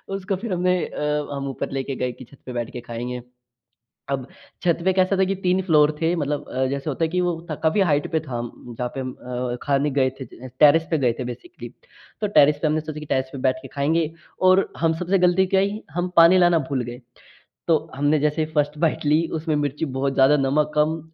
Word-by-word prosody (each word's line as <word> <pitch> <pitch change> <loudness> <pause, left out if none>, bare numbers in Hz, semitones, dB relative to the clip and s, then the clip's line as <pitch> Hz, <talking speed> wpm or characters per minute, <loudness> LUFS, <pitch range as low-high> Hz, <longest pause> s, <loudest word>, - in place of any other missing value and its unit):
उसको 195 0 -2
फ़िर 215 0 -4
हमने 180 +1 +2
अ, 150 0 -2
हम 140 0 -4
ऊपर 135 - -4
लेके 135 0 -3
गए 125 0 -2
कि 125 +1 -12
छत 135 +4 -19
पे 125 - -6
बैठ 120 -1 -3
के 120 - -6
खाएँगे। 120 +1 -5 0.9
अब 135 -2 -2 0.4
छत 170 -2 +2
पे 190 - +4
कैसा 185 +1 +2
था 190 - +4
कि 195 +1 -1
3 185 +1 +2
फ्लोर 155 -4 +4
थे 165 +1 +2
मतलब 145 -1 -2
अ, 130 +1 -1
जैसे 140 +2 -3
होता 155 +4 -1
है - - 0
कि 180 +1 0
वो 175 -2 0 0.3
काफ़ी 160 +6 +2
हाइट 150 -6 +1
पे 160 - +2
था 130 -6 -5 0.2
जहाँ 125 0 -6
पे - - -2
अ, 125 -1 -4
खाने 145 +1 +1
गए 130 -1 +2
थे 130 0 -9
टेरेस 160 +2 +6
पे 160 - +2
गए 125 -4 +2
थे - - -2
बेसिकली। 340 - -8 0.5
तो 210 - +1
टेरेस 150 -7 +4
पे - - +3
हमने 155 +1 +1
सोचा 155 0 -7
कि 150 - -8
टेरेस 130 -1 0
पे 140 - -6
बैठ 130 - 0
के 135 - -9
खाएँगे 150 +4 0 0.4
और 190 +1 +4
हम 165 -1 +2
सबसे 185 +2 +1
गलती 180 +1 +3
क्या 190 +1 +2
आई 200 +2 -1
हम 175 +2 -1
पानी 170 +2 +7
लाना 175 -2 +5
भूल 130 -3 0
गए। 120 +1 -9 0.7
तो 160 - +5 0.2
हमने 145 +2 +2
जैसे 150 +1 +1
ही 155 - -11
1st 150 0 0
बाइट 160 -1 0
ली 155 +3 +3
उसमें 155 -1 -1
मिर्ची 145 +1 -1
बहुत 135 -1 -2
ज़्यादा, 135 +3 +5
नमक 145 +2 +1
कम, 155 +2 +1
150 Hz, 225 wpm, -23 LUFS, 135-170 Hz, 0.9 s, पानी